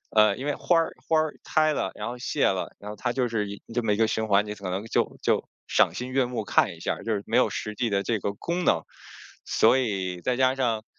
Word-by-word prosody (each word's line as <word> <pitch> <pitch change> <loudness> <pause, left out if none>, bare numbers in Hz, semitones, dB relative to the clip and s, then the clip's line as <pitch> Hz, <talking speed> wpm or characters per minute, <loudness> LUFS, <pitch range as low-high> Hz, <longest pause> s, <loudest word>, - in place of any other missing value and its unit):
呃 105 -2 +5
因 135 - -5
为 145 -1 0
花 175 - +2
儿 165 - -1
花 160 -1 +4
儿 155 -1 0
开 155 -1 +2
了， 95 - -1
然 105 - -5
后 120 +1 -5
谢 120 - 0
了， - - -1
然 105 - -8
后 105 - -6
它 120 +2 -2
就 125 -1 0
是 105 -3 -2
一 100 - -8
这 120 - +1
么 110 - +1
一 - - -1
个 115 - +3
循 110 0 -1
环， 100 +1 +4
你 105 - -4
可 100 -3 -6
能 95 +4 -3
就 115 - 0
就 - - +1 0.2
赏 - - +3
心 125 +1 -5
悦 135 0 +3
目 120 -3 -4
看 - - +3
一 - - -16
下 - - -1
儿， - - -11
就 115 - -1
是 100 - -1
没 - - -2
有 - - +4
实 105 0 -5
际 120 -2 0
的 100 -1 +1
这 115 +2 0
个 100 - -2
功 170 - -3
能。 - - +3 0.6
所 - - +4
以， 95 -8 -2
再 125 +7 0
加 130 0 +3
上， 115 -5 0
115 Hz, 295 characters per minute, -26 LUFS, 105-130 Hz, 0.6 s, 呃